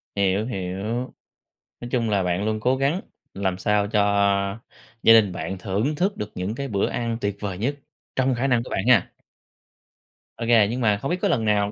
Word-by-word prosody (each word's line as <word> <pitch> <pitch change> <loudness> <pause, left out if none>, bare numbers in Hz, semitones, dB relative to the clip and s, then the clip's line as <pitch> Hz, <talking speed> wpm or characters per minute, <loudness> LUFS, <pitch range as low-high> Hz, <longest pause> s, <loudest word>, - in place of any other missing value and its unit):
Hiểu 100 +2 +1
hiểu. 95 -6 -4 1.0
Nói 120 - -7
chung 115 -3 0
là 100 -2 +1
bạn 90 +3 -1
luôn 110 0 -1
cố 125 +4 +2
gắng 140 +7 0 0.3
làm 95 -2 -1
sao 105 +1 +1
cho 105 -1 +2 1.0
gia 115 - +8
đình 105 -4 +5
bạn 95 +2 -4
thưởng 105 +11 -1
thức 190 +5 0
được 105 0 -5
những 95 +5 -3
cái 140 +1 -4
bữa 100 -4 0
ăn 115 -1 -2
tuyệt 100 -1 -2
vời 100 -3 -3
nhất 135 +8 -1 0.4
trong 130 -1 +2
khả 130 +3 0
năng 120 -3 +2
của - - -10
bạn 95 +6 -2
ha. 115 -7 +4 1.3
Ô 115 - -4
kê. 110 -4 +5
Nhưng 125 +2 -3
mà 105 -3 +3
không 135 +10 -4
biết 180 - +1
có 205 - +2
lần 115 - +1
nào 105 -1 +2
110 Hz, 205 wpm, -24 LUFS, 100-125 Hz, 1.3 s, gia